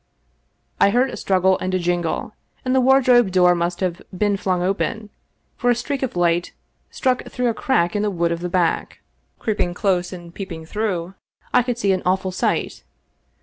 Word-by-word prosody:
I - - +6
heard 250 +5 +2
a - - -5
struggle 190 -1 +2
and 185 0 -2
a - - +3
jingle, 175 +2 -1 0.3
then 255 - 0
the 260 - +4
wardrobe 250 -4 +5
door 180 -1 +5
must 175 +1 -2
have 180 -2 -1
been 205 +2 +1
flung 185 -2 -1
open, 205 +3 -2 0.5
for 245 - +1
a 240 - +4
streak 275 +3 -3
of 260 -7 -3
light 175 0 +1 0.4
struck 255 -2 0
through 250 -1 -1
a - - 0
crack 215 - +1
in 205 - +1
the 210 - +1
wood 170 -3 0
of 170 - -2
the 180 +1 -4
back. 175 -2 0 0.4
Creeping 190 -5 -1
close 180 -2 0
and 175 -2 -10
peeping 170 -5 -7
through, 185 -2 -2 0.4
I 250 - +6
could 245 -1 -2
see 200 -4 +1
an 185 -1 +1
awful 185 +1 0
sight. 185 - -1
190 Hz, 190 wpm, -21 LUFS, 175-230 Hz, 0.5 s, I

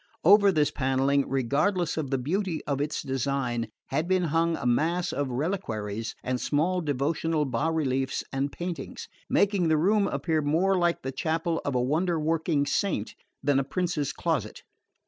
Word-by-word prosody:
Over 200 +3 +7
this 150 -4 +2
panelling, 135 +1 +1
regardless 150 - +1
of 155 -4 -3
the 135 - +1
beauty 165 +5 -2
of 140 -1 -1
its 150 +1 -2
design, 130 -3 -1 0.2
had 155 +5 -1
been 185 -1 +2
hung 165 0 +2
a - - -6
mass 165 +8 +1
of 140 0 -1
reliquaries 115 - -3
and 125 0 -2
small 175 +5 +1
devotional 150 +2 0
bas 135 +5 0
reliefs 135 -4 -1
and 135 +1 -1
paintings, 170 -5 -6 0.2
making 200 -4 +2
the 160 -1 +3
room 200 +5 +3
appear 160 -5 0
more 165 +7 +2
like 175 -2 +1
the 135 - -3
chapel 160 +3 -1
of 140 - -2
a 125 - +2
wonder 165 +5 +1
working 155 -1 +1
saint 145 - -1 0.3
than 140 -1 +3
a - - +1
prince's 155 -1 -1
closet. 145 -11 -2
150 Hz, 165 wpm, -27 LUFS, 135-170 Hz, 0.3 s, Over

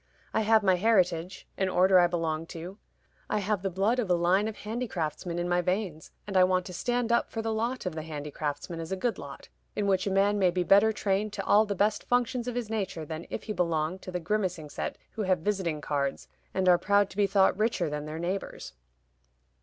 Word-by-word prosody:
I 220 - +2
have 220 0 +4
my 190 -2 +4
heritage 185 -4 +1
an 190 -1 +1
order 185 0 +5
I 175 - +5
belong 165 -2 -2
to. 180 +5 -8 0.5
I - - +1
have 205 -1 -1
the 195 - -1
blood 200 +7 +1
of 220 -6 -1
a 180 - +4
line 180 +5 +2
of 220 - -5
handicraftsmen 185 -8 -4
in 175 0 -1
my 175 0 +2
veins, 180 -3 -2 0.2
and 200 -2 -6
I 185 - +7
want 185 0 +2
to 180 - -8
stand 245 +4 -1
up 235 - +2
for 225 - -4
the 225 0 -1
lot 235 +3 -2
of 180 - -2
the 160 - -4
handicraftsman 150 +1 -5
as 165 +1 -6
a - - +1
good 230 +5 -1
lot, - - -10 0.3
in 205 - 0
which 190 -1 +1
a - - +2
man 200 +2 +2
may 185 -2 +4
be 180 +1 0
better 200 +4 +5
trained 205 0 -1
to - - -4
all 215 +1 +5
the 200 - -2
best 205 +2 +1
functions 245 0 0
of 245 - -3
his 245 -3 -2
nature 200 -7 -3
than 160 +2 -6
if - - -5
he 215 - -4
belonged 170 0 -1
to 185 - -7
the 180 - -2
grimacing 180 -4 -2
set - - -4
who 220 - -5
have 185 -2 +2
visiting 175 -5 -1
cards, 140 -2 -2 0.2
and 190 0 0
are 175 -1 +6
proud 200 0 +2
to 190 - -13
be 205 -1 +3
thought 195 -1 +4
richer 215 -4 0
than 150 0 -4
their 155 +1 -5
neighbors." 180 +4 -4
190 Hz, 230 wpm, -28 LUFS, 170-210 Hz, 0.5 s, I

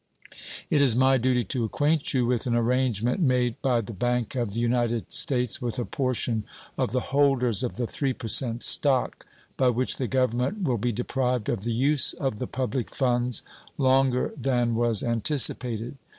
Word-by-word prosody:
It 145 - +4
is 130 -5 +3
my 130 +1 +4
duty 125 0 +1
to 120 +4 -1
acquaint 145 +7 0
you 125 -3 +1
with 120 0 -1
an 120 - +1
arrangement 120 - 0
made 125 -5 +1
by 125 -3 +1
the 110 +1 -8
Bank 120 +3 -1
of 120 -6 -2
the 115 - -3
United 120 -1 -1
States 125 -4 +1
with 120 0 -3
a 120 - -2
portion 125 -4 -1 0.3
of - - -1
the 125 - +1
holders 135 -6 +2
of 125 - -3
the 120 - -2
3% 120 -2 -1
stock, 135 -3 +1 0.3
by 130 - +3
which 125 +1 0
the 130 - -2
Government 130 - 0
will 125 -8 0
be 120 +3 0
deprived 125 0 -2
of - - -1
the 120 - -2
use 135 +5 +3
of 130 -7 -3
the 125 - -3
public 130 -1 -3
funds 125 -2 0 0.3
longer 130 -1 +2
than 125 -4 0
was 115 -2 +1
anticipated. 120 -1 0
125 Hz, 170 wpm, -26 LUFS, 120-130 Hz, 0.3 s, It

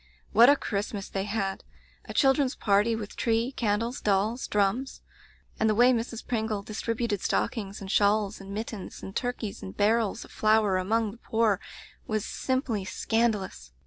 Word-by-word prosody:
What 235 +4 +7
a 285 - +7
Christmas 205 -4 -3
they 195 0 -2
had! 200 -2 -2 0.4
A - - -7
children's 270 -1 +3
party, 210 +2 +2
with 210 -2 -6
tree, 230 +2 +1
candles, 230 +2 -1
dolls, 210 +5 +1
drums; 210 +6 0 0.6
and 220 - +3
the 215 - +2
way 245 +3 +6
Mrs. 230 -1 -3
Pringle 220 -4 -1
distributed 220 -1 -2
stockings 205 -3 -1
and 195 -1 -5
shawls 205 0 +2
and 195 0 -9
mittens 215 -1 -6
and 195 - -8
turkeys 245 -4 -3
and 95 +1 -8
barrels 220 +1 +1
of - - -17
flour 215 -3 +3
among 215 +3 0
the 230 - -14
poor 220 -5 +1 0.5
was 215 -2 -1
simply 260 -6 -1
scan 225 +4 +1
dalous! 70 - -8
215 Hz, 160 wpm, -28 LUFS, 200-230 Hz, 0.6 s, What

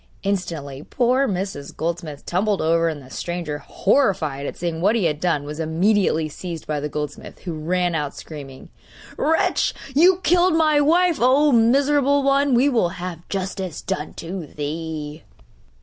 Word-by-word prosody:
Instantly 165 -9 -3
poor 255 - +1
Mrs. 190 - -4
Goldsmith 165 -2 -4
tumbled 200 +3 0
over; 165 +1 +2
and 150 -3 -6
the 130 - -15
stranger, 170 -3 -4
horrified 160 - 0
at - - -6
seeing 165 -2 -3
what 205 +5 +3
he 225 - +1
had 150 -2 0
done, 165 -5 0
was 150 +2 -7
immediately 165 0 +2
seized 165 +1 -7
by 150 -1 -2
the 150 +1 -3
goldsmith, 150 0 -6
who 175 - -5
ran 175 +3 0
out 150 -3 -2
screaming: 140 -4 -10 0.5
'Wretch! 320 +1 +1 0.2
you 350 +7 +6
have 370 - -17
killed 355 0 +4
my 310 -2 +4
wife! 340 +2 +3
Oh, 275 +4 +4
miserable 280 +4 +3
one; 275 -1 +3
we 255 +4 +4
will 230 -10 +2
have 175 -2 -7
justice 190 -3 -4
done 150 - -4
to 170 -1 -6
thee! 150 0 -5
180 Hz, 160 wpm, -22 LUFS, 155-255 Hz, 0.5 s, you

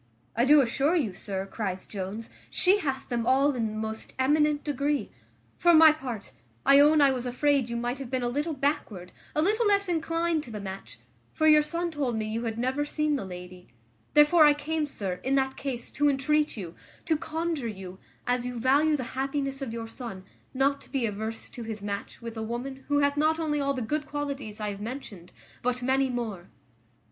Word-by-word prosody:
"I 235 +2 +3
do 295 +1 +7
assure 275 +6 +1
you, 250 - 0
sir," 195 0 -4
cries 195 -2 -4
Jones, 205 +3 -6 0.2
"she 385 +3 +3
hath 270 -7 -3
them 235 -2 -2
all 275 +3 +4
in 235 -3 -1
the 215 - -5
most 220 0 -5
eminent 295 +2 +2
degree: 290 0 -1 0.5
for 345 -1 +6
my 320 0 +9
part, 255 -9 -6 0.3
I 275 0 +7
own 300 +1 +6
I 280 -1 +6
was 250 -1 -3
afraid 270 0 +1
you 235 - -2
might 240 +3 -2
have 270 -3 -6
been 260 -1 -1
a - - +1
little 295 +6 -1
backward, 245 - -2 0.2
a 305 - +3
little 430 +5 +2
less 400 -1 +3
inclined 330 -1 0
to - - -11
the 215 -2 -6
match; 195 -1 -8 0.4
for 315 - +3
your 305 -1 +7
son 340 +3 -2
told 280 -6 -1
me 220 -1 -1
you 225 +2 -3
had 225 -1 -3
never 260 +4 0
seen 300 0 0
the 220 - -3
lady; 180 0 -9 0.5
therefore 300 +2 +7
I 295 -1 +7
came, 305 +1 -2
sir, 190 -9 -4
in 265 +1 +1
that 265 -1 +1
case, 260 -4 -5
to 290 +1 +2
entreat 300 +1 +1
you, 175 -5 -6 0.3
to 325 - +2
conjure 315 -3 -2
you, 190 -3 -8 0.3
as 245 0 +1
you 250 0 -4
value 290 +5 +3
the 260 - -3
happiness 275 +1 -2
of 265 -4 -3
your 230 0 -5
son, 225 -5 -8 0.3
not 275 +1 +1
to - - -17
be 270 -4 0
averse 220 +1 -4
to 245 - -8
his 220 -3 -6
match 200 0 -5
with 230 -1 -6
a 220 - -4
woman 250 +4 -5
who 290 0 +2
hath 285 0 +2
not 315 +2 +2
only 300 -2 0
all 280 0 0
the 255 - -2
good 300 +6 -2
qualities 280 -7 -4
I 210 -1 -2
have 200 0 -8
mentioned, 210 -7 -7 0.3
but 250 0 -1
many 265 +1 +2
more." 220 -8 -4
265 Hz, 210 wpm, -27 LUFS, 225-295 Hz, 0.5 s, my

